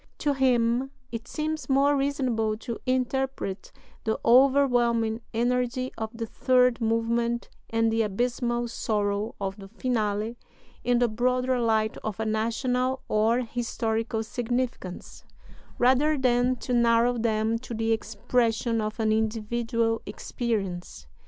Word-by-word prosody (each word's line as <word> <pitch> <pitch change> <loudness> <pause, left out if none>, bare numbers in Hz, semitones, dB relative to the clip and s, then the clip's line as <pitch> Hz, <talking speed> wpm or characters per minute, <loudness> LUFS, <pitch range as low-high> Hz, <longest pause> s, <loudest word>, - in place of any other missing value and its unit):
To 290 - +1
him 250 -1 +2 0.2
it 230 0 -6
seems 310 -3 -3
more 280 +2 +4
reasonable 255 -6 0
"to 235 +1 -6
interpret 260 -5 -1 0.3
the 220 - -1
overwhelming 240 -3 +4
energy 250 +2 0
of 220 -1 -4
the 230 -1 -5
third 250 +1 +2
movement 230 +1 0 0.2
and 225 0 +2
the 225 0 +2
abysmal 240 +3 -1
sorrow 210 -2 -1
of 195 0 -3
the 195 -1 -10
Finale 220 0 -2 0.4
in 245 0 +2
the 245 0 +3
broader 250 +3 +1
light 220 -2 +1
of 215 -2 -5
a 220 - -1
national 250 +4 0
or 225 +3 +3
historical 225 -1 -2
significance, 240 -5 -4 0.5
rather 270 +5 +3
than 250 -1 +2
to 250 0 -4
narrow 235 0 +3
them 220 0 +1
to 240 -1 -7
the 225 +1 0
expression 225 +1 0
of 215 +1 -4
an 220 -1 +2
individual 225 +1 0
experience. 185 - -4
235 Hz, 125 wpm, -26 LUFS, 220-250 Hz, 0.5 s, more